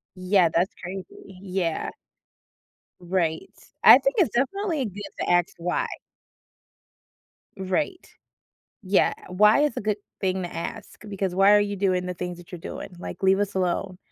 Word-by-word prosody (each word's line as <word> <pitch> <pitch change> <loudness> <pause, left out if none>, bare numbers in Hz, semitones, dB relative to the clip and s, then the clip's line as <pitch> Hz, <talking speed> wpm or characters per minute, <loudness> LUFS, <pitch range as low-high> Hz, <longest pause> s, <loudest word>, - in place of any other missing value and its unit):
Yeah, 185 -1 +3
that's 175 +3 +1
crazy. 185 +1 -6 0.4
Yeah. 180 -4 -2 1.1
Right. 175 -3 -1 0.3
I - - +10
think - - 0
it's 330 - +2
definitely 300 +3 0
good 205 -1 -7 0.2
to - - -2
ask, 175 -1 +2
"Why?" 175 +1 -1 1.7
Right. 210 - -2 0.8
Yeah, 190 0 +3 0.2
uh, - - -8
"Why?" 210 +7 +5
is 295 -5 0
a - - -1
good 210 0 -1 0.2
thing 185 -1 0
to 175 - -6
ask 205 +6 -7
because, 195 -2 -2
"Why 195 +2 +6
are 205 - +7
you 205 0 -1
doing 185 -2 0
the 180 - -3
things 180 0 -5
that 175 +1 -15
you're 175 - -7
doing?" 180 - -8
like, 190 - -8
"Leave 190 +1 +4
us 205 -1 -2
alone." 185 0 -1
190 Hz, 155 wpm, -25 LUFS, 180-205 Hz, 1.7 s, I